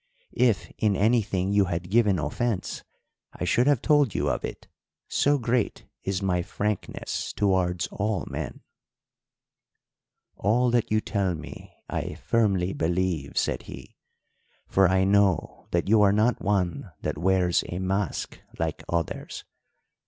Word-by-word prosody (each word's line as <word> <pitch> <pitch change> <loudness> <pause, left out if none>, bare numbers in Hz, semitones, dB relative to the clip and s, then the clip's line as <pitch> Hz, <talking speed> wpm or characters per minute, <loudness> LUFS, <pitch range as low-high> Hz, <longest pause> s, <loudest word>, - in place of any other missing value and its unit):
If 120 -6 +2
in 105 -2 +2
anything 100 -3 +1
you 100 -1 +4
had 90 0 -4
given 105 -4 +4
offence 90 - -2 0.5
I - - -5
should 120 +9 +2
have 145 -5 +3
told 145 - +3
you - - +1
of - - -3
it, - - -6 0.4
so 145 +1 +2
great 120 -2 -1 0.2
is 95 0 -2
my 90 -2 +1
frankness 105 +3 -3
towards 95 -3 +1
all 105 -4 -1
men.' - - -5 1.8
"'All 120 +5 +2
that 120 -2 +1
you 110 0 +3
tell 100 -5 -1
me 80 - -10 0.2
I - - -3
firmly 95 -5 +1
believe,' 85 -3 -1
said - - 0
he, - - -10 0.7
'for 95 -1 +4
I 95 +1 +3
know 100 -3 +2
that 85 +1 0
you 110 +1 +5
are 100 -1 +6
not 110 +4 +2
one 95 -4 -1
that - - -3
wears 90 -1 +2
a 85 - -4
mask 95 -2 -2 0.2
like - - -2
others. 85 -2 -3
95 Hz, 135 wpm, -26 LUFS, 90-110 Hz, 1.8 s, are